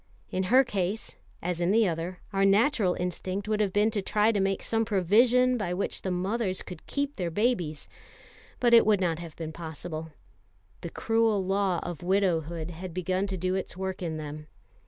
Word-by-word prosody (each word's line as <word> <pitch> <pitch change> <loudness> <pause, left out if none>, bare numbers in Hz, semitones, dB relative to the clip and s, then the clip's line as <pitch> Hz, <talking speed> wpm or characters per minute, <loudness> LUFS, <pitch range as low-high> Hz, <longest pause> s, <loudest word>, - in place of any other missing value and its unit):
In 185 0 -1
her 255 +7 +6
case, 200 -2 -3 0.3
as 175 0 -2
in 175 - +2
the 220 +1 +4
other, 170 +2 -3
our 195 0 +2
natural 200 -1 +3
instinct 185 +3 -3
would 215 0 0
have 205 -3 +1
been 210 +3 +3
to 210 - -1
try 210 +3 +2
to 210 - 0
make 195 0 0
some 225 0 +1
provision 235 +6 +3
by 180 -4 -2
which 195 - -2
the 190 - -3
mothers 190 +2 -1
could 180 -3 -10
keep 285 0 -2
their 180 -3 -1
babies; 175 - -1 0.7
but 240 -1 +3
it 230 - +9
would 210 -2 +3
not 170 -3 0
have 170 -2 -9
been 160 -1 -5
possible. 160 0 -6 0.7
The - - -5
cruel 225 -1 +1
law 195 -2 +1
of 175 -4 -6
widowhood 175 -3 0
had 175 +1 -8
begun 185 +2 0
to 190 -1 -3
do 185 +1 -1
its 190 -1 -3
work 190 0 -4
in 165 -3 -3
them. 150 0 -7
190 Hz, 190 wpm, -28 LUFS, 175-210 Hz, 0.7 s, it